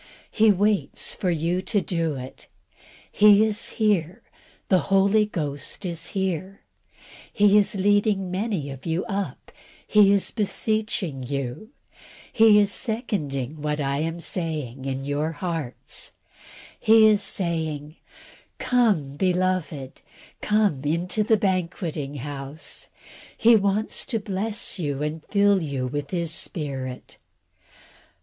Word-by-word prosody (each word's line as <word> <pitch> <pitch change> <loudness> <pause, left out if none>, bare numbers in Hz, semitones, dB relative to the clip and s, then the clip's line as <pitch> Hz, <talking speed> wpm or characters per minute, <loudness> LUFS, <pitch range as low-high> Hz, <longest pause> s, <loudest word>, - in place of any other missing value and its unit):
He 220 0 +4
waits 205 +1 0
to 175 0 0 0.2
do 165 -4 -1
it; 130 0 -9 0.6
He 210 0 +6
is 215 0 -2
here. 205 -2 0 0.4
The 185 - +4
Holy 200 +2 +4
Ghost 150 0 -4
is 170 -2 -3
here: 190 0 -2 0.7
He 205 -1 +4
is 210 0 +4
leading 200 -1 +2
many 185 -7 -2
of 135 +3 -9
you 165 +2 -1
up; 200 -2 -5 0.3
He 210 -2 +5
is 200 -1 +2
beseeching 215 - -1
you; 140 - -4 0.6
He 220 -2 +6
is 205 -1 +3
seconding 155 - -3
what 150 0 -2
I 140 0 -1
am 165 +2 -2
saying, 150 -8 -3
in 135 0 -3
your 150 +3 -1
hearts; 160 -6 -5 0.7
He 220 0 +6
is 215 -1 +5
saying, 160 -5 -2 0.6
"Come, 200 - +1
beloved; 180 -6 -1 0.4
come 210 -10 +1
into 170 +7 0
the 220 0 +3
banqueting 170 -7 -2
house;" 145 +2 -6 0.5
He 235 0 +6
wants 200 +1 +1
to 225 - -1
bless 205 0 -2
you 145 -3 -2
and 155 +1 -4
fill 200 -1 +3
you 140 -5 -3
with 145 +2 -4
His 170 -3 -1
Spirit. 135 -7 -3
180 Hz, 115 wpm, -24 LUFS, 145-205 Hz, 0.7 s, He